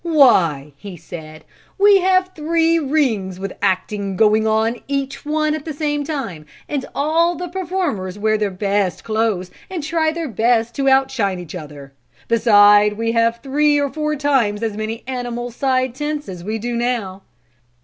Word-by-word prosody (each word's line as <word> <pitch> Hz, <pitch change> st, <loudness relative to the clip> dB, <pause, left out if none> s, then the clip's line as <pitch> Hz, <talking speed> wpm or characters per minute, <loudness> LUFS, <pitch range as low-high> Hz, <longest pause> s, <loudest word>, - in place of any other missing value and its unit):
"Why!" 185 Hz, -, +3 dB
he 190 Hz, +2 st, -9 dB
said, 155 Hz, -1 st, -10 dB, 0.3 s
"we 400 Hz, 0 st, +6 dB
have 370 Hz, 0 st, +2 dB
three 330 Hz, +1 st, +1 dB
rings 250 Hz, -, 0 dB
with 195 Hz, 0 st, -5 dB
acting 195 Hz, +1 st, -1 dB
going 220 Hz, +2 st, +3 dB
on 220 Hz, +2 st, +1 dB
in -, -, -20 dB
each 275 Hz, -1 st, -3 dB
one 305 Hz, 0 st, +1 dB
at 310 Hz, -2 st, -4 dB
the 310 Hz, -2 st, -6 dB
same 295 Hz, -1 st, -1 dB
time, 245 Hz, -, -5 dB, 0.2 s
and 285 Hz, -3 st, -2 dB
all 330 Hz, +4 st, +2 dB
the 355 Hz, +1 st, -5 dB
performers 340 Hz, -, -3 dB
wear 215 Hz, +1 st, +1 dB
their 210 Hz, -1 st, 0 dB
best 195 Hz, -1 st, -1 dB
clothes 215 Hz, -5 st, -1 dB, 0.2 s
and 360 Hz, -5 st, -4 dB
try 315 Hz, +1 st, +1 dB
their 330 Hz, 0 st, -4 dB
best 230 Hz, 0 st, +1 dB
to 275 Hz, -1 st, +2 dB
outshine 265 Hz, -8 st, +2 dB
each 175 Hz, -3 st, -9 dB
other; 145 Hz, -5 st, -9 dB, 0.3 s
beside 210 Hz, -2 st, +5 dB
we 230 Hz, +2 st, -1 dB
have 230 Hz, 0 st, +1 dB
three 290 Hz, +2 st, +2 dB
or 285 Hz, -1 st, -1 dB
four 305 Hz, -1 st, -1 dB
times 260 Hz, -8 st, +1 dB
as 220 Hz, -2 st, -2 dB
many 215 Hz, +2 st, -4 dB
animal 245 Hz, -1 st, -4 dB
side 255 Hz, 0 st, 0 dB
tents 295 Hz, +2 st, -4 dB
as 180 Hz, -3 st, -8 dB
we 215 Hz, +4 st, -3 dB
do 240 Hz, +2 st, -4 dB
now. 235 Hz, -6 st, -2 dB
235 Hz, 170 wpm, -19 LUFS, 205-295 Hz, 0.3 s, we